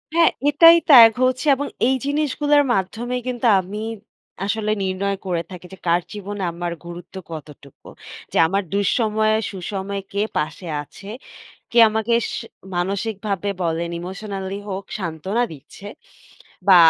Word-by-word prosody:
হ্যাঁ, 335 -1 +5 0.2
এটাই 330 +3 +8
ত্যাগ 235 -5 +10
হচ্ছে 255 +3 +1
এবং 285 +2 -3 0.2
এই 265 - +3
জিনিসগুলার 290 0 +2
মাধ্যমেই 235 +6 -2
কিন্তু 245 -1 0
আমি 195 +3 -5 0.7
আসলে 215 +1 -1
নির্ণয় 195 +1 -1
করে 175 -3 -1
থাকি 180 -1 -9
যে - - -10
কার 170 +1 +3
জীবনে 205 -1 -5
আমার 170 0 -4
গুরুত্ব 175 +2 -10 0.2
কতটুকু। 145 -3 -11 0.4
যে - - -2
আমার 195 +3 0
দুঃসময়ে 215 +1 +2 0.2
সুসময়ে 195 +1 -4
কে 200 - 0 0.2
পাশে 155 +4 -3
আছে, 195 +7 -13 0.6
কে 240 - +1
আমাকে 220 +2 -1 0.2
সে - - -6 0.3
মানসিকভাবে 200 +2 -2
বলেন 170 0 -1
ইমোশনালি 195 +1 -5
হোক, 195 0 -4
সান্ত্বনা 185 +6 -2
দিচ্ছে 155 +7 -13 0.8
বা 190 - +9
200 Hz, 130 wpm, -21 LUFS, 180-225 Hz, 0.8 s, ত্যাগ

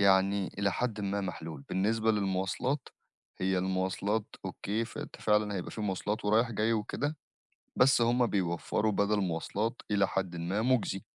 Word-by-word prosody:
يعني 95 0 +4
إلى 100 -1 +2
حدٍ 115 -2 -1
ما 100 0 -1
محلول. 80 -6 -5
بالنسبة 110 +4 +2
للمواصلات، 105 +7 -1 0.5
هي 95 0 +1
المواصلات 95 +3 0 0.2
أوكي 110 +3 -2
فأنت - - -8
فعلًا 105 -1 +2
هيبقى 90 - -4
في - - -6
مواصلات 105 +1 -2
ورايح 110 +3 +3
جاي 110 +1 +1
وكده 140 +8 -1 0.6
بس 130 -1 +5
هُم 120 +1 +3
بيوفّروا 100 +2 0
بَدل 100 +1 +2
مواصلات 100 +6 -2
إلى 100 -1 +4
حدٍ 95 -3 -2
ما 90 +6 -1
مجزي. 120 -6 +1
100 Hz, 145 wpm, -31 LUFS, 95-110 Hz, 0.6 s, بس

